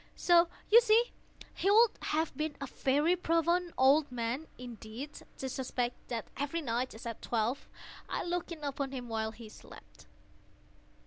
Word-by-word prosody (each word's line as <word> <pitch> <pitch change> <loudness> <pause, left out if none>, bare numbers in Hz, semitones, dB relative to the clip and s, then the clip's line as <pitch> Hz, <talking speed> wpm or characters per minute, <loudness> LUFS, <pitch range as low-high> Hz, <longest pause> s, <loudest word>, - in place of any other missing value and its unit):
So 345 -1 +5 0.2
you 465 +2 +10
see 465 +1 +4 0.4
he 390 - 0
would 440 +2 +7
have 315 -1 -1
been 305 +1 -2
a 275 - -3
very 290 +6 +2
profound 340 +1 +1
old 275 +2 +5
man, 245 +5 -3
indeed, 240 +3 -8 0.2
to 265 - -4
suspect 250 -1 -3
that 230 -3 -3
every 290 +5 -2
night, 245 0 -1
just 225 +3 -11
at 230 -2 -5
twelve, 235 +3 -1 0.4
I - - -2
looked 350 0 -2
in 315 -3 -7
upon 280 -1 -3
him 245 -2 -6
while 220 -1 -1
he 225 0 -11
slept. 215 - -15
275 Hz, 155 wpm, -32 LUFS, 240-335 Hz, 0.4 s, you